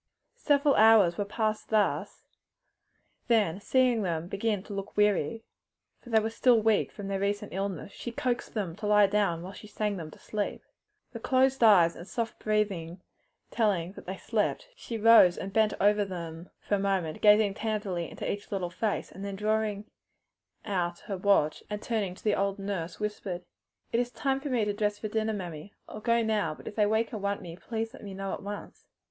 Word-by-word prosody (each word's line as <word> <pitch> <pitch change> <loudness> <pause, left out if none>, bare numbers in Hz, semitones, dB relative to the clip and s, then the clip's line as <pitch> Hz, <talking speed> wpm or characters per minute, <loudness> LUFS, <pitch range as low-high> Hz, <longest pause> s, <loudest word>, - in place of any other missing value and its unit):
Several 285 -1 +3
hours 215 -6 +6
were 205 - 0
passed 215 +1 -2
thus, 215 -2 0 1.0
then 210 -7 +2
seeing 250 -1 +3
them 170 -3 -2
begin 200 +1 -1
to 205 - -9
look 195 +1 -6
weary 210 0 +2 0.6
for 245 - -15
they 225 -1 +5
were 220 +1 -2
still 235 +1 +4
weak 220 -1 +2
from 205 -2 -7
their 195 -1 -2
recent 205 +1 -2
illness 195 -1 -3
she 240 - -7
coaxed 245 0 -2
them 190 -6 -2
to 210 - -4
lie 210 0 +6
down 195 -4 0
while 190 +2 -8
she 210 - -11
sang 210 -1 -2
them 160 -3 -6
to - - -14
sleep. 210 -1 -4 0.5
The 230 - -7
closed 260 +1 +2
eyes 180 -7 +6
and 170 - -10
soft 230 -1 -4
breathing 195 -5 -1 0.5
telling 195 -7 +1
that 195 - -13
they 190 +1 -4
slept, 220 - -1
she 230 - -6
rose 220 -5 +7
and 195 0 -6
bent 220 -1 +3
over 205 +1 +4
them 170 -3 -7 0.2
a 205 - +3
moment, 190 -5 -1
gazing 210 -1 +5
tenderly 205 -6 -3
into - - -6
each 205 0 -4
little 185 -3 -2
face, 210 +3 -2
then 200 0 -5
drawing 210 0 -1 0.8
out 175 -3 -2
her 200 - -5
watch 185 -5 +2
and 210 0 -3
turning 210 -5 -2
to - - -17
the 210 - +2
old 200 0 0
nurse, 195 -4 -4
whispered, 200 -4 -4 0.5
"It 230 - +3
is 245 0 0
time 270 +1 -1
for 290 - -4
me 240 -5 +1
to 205 - -1
dress 210 0 -1
for 215 - -5
dinner, 220 0 0
mammy. 180 -2 -7
I'll 215 - -8
go 230 +2 +2
now, 210 -8 0
but - - -14
if - - -6
they 210 -2 +3
wake 220 +3 0
and 215 - -4
want 200 0 -2
me 170 -2 -8
let 225 -1 -4
me 200 -2 -7
know 195 0 -4
at - - -5
once." 205 0 -8
205 Hz, 195 wpm, -29 LUFS, 190-220 Hz, 1.0 s, rose